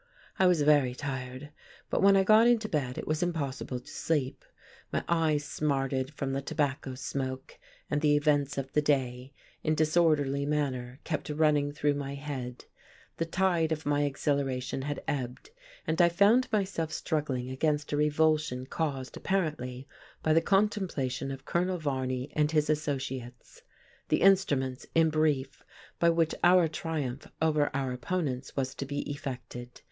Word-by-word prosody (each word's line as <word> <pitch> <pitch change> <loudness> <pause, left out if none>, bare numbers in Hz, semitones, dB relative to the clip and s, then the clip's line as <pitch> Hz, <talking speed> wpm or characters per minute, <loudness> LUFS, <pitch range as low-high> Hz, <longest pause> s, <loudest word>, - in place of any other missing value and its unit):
I 190 - +6
was 175 -5 +3
very 145 -4 +4
tired. 130 0 -5 0.4
But - - +1
when 195 0 +6
I 195 - +4
got 215 +4 +6
into 230 -3 +3
bed, 135 -8 -2
it - - -4
was 155 +2 -1
impossible 140 -7 -2
to - - -23
sleep. 145 -5 -2 0.5
My - - -1
eyes 160 -3 +2
smarted 135 -2 -1
from 135 -2 -2
the 135 - -1
tobacco 135 -2 -2
smoke; 130 0 -5 0.3
and 150 0 -1
the 150 -1 +4
events 145 -1 +1
of 135 0 -4
the 150 - +3
day, 130 -3 0 0.3
in 155 - +1
disorderly 155 -3 +2
manner, 135 -4 -2
kept 155 -2 -3
running 150 -1 +2
through 145 0 +1
my 140 -1 -4
head. 135 -4 -6 0.5
The 165 - -1
tide 170 -2 +1
of 160 0 -2
my 145 0 +2
exhilaration 135 -2 -1
had 145 +1 -4
ebbed, 130 - -4 0.3
and 160 - +1
I 170 - +6
found 205 +9 +4
myself 190 -7 -1
struggling 135 -7 -2
against 150 +2 0
a - - +1
revulsion 150 -3 +2
caused, 135 -3 -3
apparently, 150 -9 -2 0.4
by 155 - +3
the 165 - +5
contemplation 190 - 0
of 135 -1 -7
Colonel 180 +1 0
Varney 130 -4 -2
and 150 -1 +3
his 155 -1 +2
associates; 135 -5 -4 0.5
the - - +2
instruments, 140 -10 +3
in 165 -1 +4
brief, 150 -4 0 0.4
by 170 - +5
which 165 -1 +2
our 175 -1 +6
triumph 155 -5 -4
over 155 -2 +2
our 135 -2 -1
opponents 130 -1 -3
was 130 -1 -1
to 140 - -5
be 145 +1 -2
effected. 125 -3 -7
145 Hz, 155 wpm, -29 LUFS, 135-160 Hz, 0.5 s, I